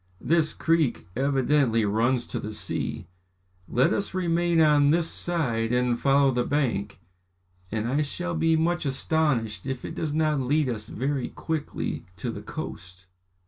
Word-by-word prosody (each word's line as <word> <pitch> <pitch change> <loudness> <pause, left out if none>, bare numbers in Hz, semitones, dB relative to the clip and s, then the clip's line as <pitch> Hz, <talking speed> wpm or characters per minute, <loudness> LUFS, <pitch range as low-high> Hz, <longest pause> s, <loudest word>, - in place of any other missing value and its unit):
"This 160 -1 +2
creek 160 -6 +1
evidently 135 -3 +2
runs 120 +4 +1
to - - -4
the 105 - -5
sea. - - -3 0.6
Let 125 +3 +2
us 200 -2 -2
remain 170 -1 +1
on 150 -2 +5
this 165 +2 +2
side 120 -12 -1
and 125 -1 +1
follow 140 0 +4
the 125 -1 0
bank, 125 -8 -1 0.7
and 110 +1 -1
I 140 +5 +1
shall 175 +4 -3
be 165 0 +2
much 170 +2 +1
astonished 135 - 0
if 130 -2 -4
it - - -5
does 155 -2 -3
not 155 -2 +2
lead 140 +2 +1
us 110 -3 -4
very 135 +1 -2
quickly 160 - -4
to - - -4
the - - -7
coast. 90 0 -8
140 Hz, 150 wpm, -26 LUFS, 120-160 Hz, 0.7 s, on